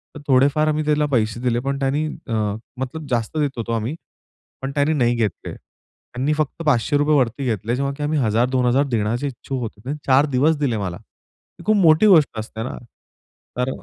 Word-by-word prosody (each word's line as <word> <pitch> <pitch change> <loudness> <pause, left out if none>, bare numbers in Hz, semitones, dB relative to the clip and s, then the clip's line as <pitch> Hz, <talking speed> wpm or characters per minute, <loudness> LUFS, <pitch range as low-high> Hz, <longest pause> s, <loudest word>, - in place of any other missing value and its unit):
तर 150 - -8
थोडेफार 140 +3 +3
आम्ही 155 0 0
त्याला 150 0 +2
पैसे 110 -3 +1
दिले, 120 -1 +1
पण 140 +2 -3
त्यानी 140 +3 0 0.2
अ, 115 - -3 0.5
मतलब 145 +4 -5
जास्त 120 +4 -1
देत 145 -3 -1
होतो 115 0 -3
आम्ही, 115 +6 -2 0.7
पण 135 +1 -3
त्यानी 145 +2 +2
नाही 120 -5 +2
घेतले. 110 -6 -2
त्यांनी 135 +5 -6
फक्त 155 +1 -2
₹500 145 +2 +2
वरती 130 0 +1
घेतले, 115 0 -1
जेव्हा 140 +1 -1
की 150 - -4
आम्ही 150 +1 0
1000-2000 125 +3 +2
देण्याचे 120 +2 -1
इच्छूक 130 0 -5
होतो. 110 -3 -6
त्याने 140 +4 -4
4 135 +2 +5
दिवस 150 +5 +3
दिले 135 -6 0
मला. 95 -4 -4
ही 105 - -22
खूप 215 +1 +3
मोठी 165 +2 +5
गोष्ट 155 - +4
असते, 110 +1 -6
ना, 125 - -5 0.8
तर 125 +1 0
135 Hz, 180 wpm, -21 LUFS, 120-150 Hz, 0.8 s, 4